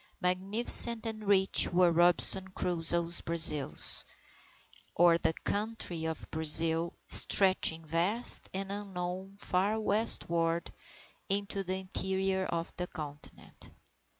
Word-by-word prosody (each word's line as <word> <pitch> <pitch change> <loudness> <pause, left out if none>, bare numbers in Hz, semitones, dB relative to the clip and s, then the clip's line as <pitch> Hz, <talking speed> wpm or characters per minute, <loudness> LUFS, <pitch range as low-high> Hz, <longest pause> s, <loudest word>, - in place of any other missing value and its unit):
Magnificent 215 +5 +4
and 215 -2 -8
rich 195 -1 +3
were 175 0 +1
Robinson 175 +3 +3
Crusoe's 170 -2 -3
Brazils, 150 - +2 0.9
or 170 0 +2
the 160 - -2
Country 205 -6 -5
of 160 0 -7
Brazil, 160 +1 +5
stretching 185 -4 +2
vast 175 +10 -2
and 195 +1 -7
unknown 190 -1 -8
far 200 +3 -3
westward 170 -6 +1 0.6
into 200 0 -4
the 185 0 -4
interior 190 0 -4
of 165 0 -6
the 180 0 -5
continent. 150 -4 -12
180 Hz, 100 wpm, -28 LUFS, 165-195 Hz, 0.9 s, Brazil